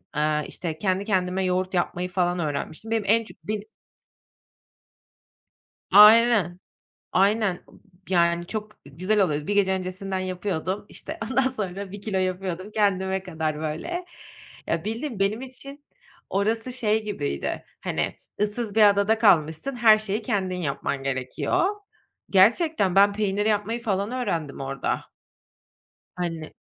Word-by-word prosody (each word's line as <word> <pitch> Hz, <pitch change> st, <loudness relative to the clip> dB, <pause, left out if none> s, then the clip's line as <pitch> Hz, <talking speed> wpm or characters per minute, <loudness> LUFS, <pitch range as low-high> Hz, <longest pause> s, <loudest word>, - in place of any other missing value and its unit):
Eee, 150 Hz, 0 st, +1 dB
işte, 160 Hz, -3 st, -4 dB
kendi 190 Hz, +2 st, 0 dB
kendime 190 Hz, -2 st, 0 dB
yoğurt 185 Hz, +1 st, 0 dB
yapmayı 180 Hz, 0 st, -1 dB
falan 180 Hz, -1 st, 0 dB
öğrenmiştim. 155 Hz, +7 st, -4 dB
Benim 225 Hz, -2 st, +1 dB
en 225 Hz, +3 st, +4 dB
çok -, -, -12 dB
beni 210 Hz, +3 st, -3 dB, 2.3 s
Aynen, 210 Hz, -3 st, +7 dB, 0.5 s
aynen, 200 Hz, +1 st, +3 dB
ıb -, -, -19 dB, 0.3 s
yani, 170 Hz, -1 st, +2 dB
çok 215 Hz, +2 st, -5 dB
güzel 185 Hz, +9 st, 0 dB
oluyor. 150 Hz, -6 st, +1 dB
Z -, -, -12 dB
bir 205 Hz, -, 0 dB
gece 195 Hz, -2 st, +3 dB
öncesinden 190 Hz, +1 st, -3 dB
yapıyordum, 185 Hz, +1 st, -3 dB
işte, -, -, -8 dB
ondan 260 Hz, 0 st, +3 dB
sonra 200 Hz, -5 st, -5 dB
1 205 Hz, -, -7 dB
kilo 200 Hz, -3 st, -1 dB
yapıyordum 185 Hz, +1 st, -3 dB
kendime 190 Hz, -3 st, +1 dB
kadar 160 Hz, -4 st, -3 dB
böyle. 165 Hz, -, -3 dB, 0.6 s
Ya, 165 Hz, +2 st, -1 dB
bildiğin, 225 Hz, +1 st, -4 dB
benim 200 Hz, +4 st, +1 dB
için, 275 Hz, +2 st, -10 dB, 0.5 s
orası 225 Hz, +5 st, 0 dB
şey 220 Hz, -3 st, +1 dB
gibiydi, 70 Hz, -, -3 dB, 0.2 s
hani, -, -, -2 dB, 0.2 s
ıssız 210 Hz, 0 st, -1 dB
bir 220 Hz, -, +5 dB
adada 200 Hz, +2 st, +2 dB
kalmışsın 180 Hz, -, +3 dB
her 220 Hz, -3 st, +6 dB
şeyi 215 Hz, +1 st, -2 dB
kendin 190 Hz, -5 st, -1 dB
yapman 140 Hz, -4 st, -3 dB
gerekiyor 130 Hz, -, -1 dB, 0.7 s
Gerçekten 205 Hz, -, +4 dB
ben 200 Hz, +1 st, +6 dB
peynir 205 Hz, 0 st, -1 dB
yapmayı 220 Hz, +2 st, 0 dB
falan 200 Hz, -2 st, -1 dB
öğrendim 165 Hz, -, -3 dB
orada. 135 Hz, 0 st, -3 dB, 1.1 s
Hani 165 Hz, -3 st, -4 dB
195 Hz, 130 wpm, -25 LUFS, 175-215 Hz, 2.3 s, Aynen